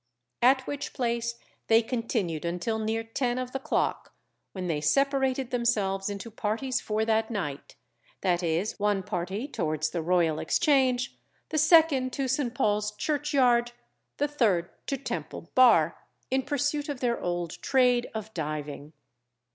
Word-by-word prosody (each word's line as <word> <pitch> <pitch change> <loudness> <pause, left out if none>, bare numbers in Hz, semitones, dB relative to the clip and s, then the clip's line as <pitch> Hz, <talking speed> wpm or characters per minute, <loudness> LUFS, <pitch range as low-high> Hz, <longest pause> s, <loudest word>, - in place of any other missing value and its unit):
At 260 +2 +4
which 285 -1 -5
place 235 -1 -1 0.3
they 225 +1 +5
continued 225 - -2
until 180 +6 -2
near 220 +1 -1
ten 240 +2 -1
of 255 0 -3
the 270 - -3
clock, - - -1 0.4
when 185 -2 -5
they 160 -4 -1
separated 270 - +1
themselves 210 -6 0
into 205 +3 -6
parties 225 +5 -2
for 215 +1 -1
that 220 0 +1
night, 170 -11 -5 0.5
viz., 175 +1 0
one 205 -2 +1
party 195 +5 -3
towards 155 - -2
the 170 - -2
Royal 165 -2 +2
Exchange, 260 -5 +2 0.3
the 310 - 0
second 310 -5 +5
to 270 +1 -1
St. 255 -2 -1
Paul's 210 -3 +1
Churchyard, 260 -3 +1 0.4
the 290 - +1
third 215 -12 +1 0.2
to 275 - -1
Temple 275 - -6
Bar, 220 -11 +5 0.3
in 265 0 +2
pursuit 290 +2 -1
of 285 -3 -3
their 240 -2 0
old 175 -2 -3
trade 250 -2 +3
of 220 0 -5
diving. 150 -1 -5
230 Hz, 140 wpm, -28 LUFS, 185-260 Hz, 0.5 s, they